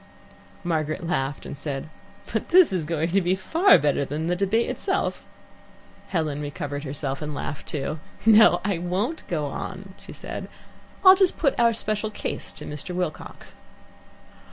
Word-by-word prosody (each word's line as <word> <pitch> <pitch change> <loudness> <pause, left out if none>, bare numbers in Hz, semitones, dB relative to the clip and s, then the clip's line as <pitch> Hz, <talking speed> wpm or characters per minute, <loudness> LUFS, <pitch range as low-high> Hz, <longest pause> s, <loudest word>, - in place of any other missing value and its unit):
Margaret 160 -1 -1
laughed 145 -5 -2
and - - -6
said, 140 -1 -4 0.5
"But - - -2
this 360 - +6
is 175 -4 -1
going 165 +1 -1
to 195 +2 +3
be 180 +1 +1
far 325 - +5
better 145 -2 +1
than 150 +3 -3
the 175 +1 +1
debate 200 +5 +1
itself." - - -2 0.8
Helen 155 -5 -1
recovered 145 0 -4
herself 140 0 -4
and 150 -1 -4
laughed 145 0 -5
too. 150 +1 -3 0.3
"No, 215 -5 +7
I 200 -5 0
won't 195 - -2
go 155 -4 -1
on," 190 +6 -6
she - - -12
declared. - - -6 0.6
"I'll 375 - +11
just 380 -1 +2
put 280 -5 +2
our 235 -1 +5
special 215 -1 -2
case 215 - -4
to - - -10
Mr. 150 +5 -4
Wilcox." 180 -4 -5
175 Hz, 155 wpm, -25 LUFS, 150-205 Hz, 0.8 s, I'll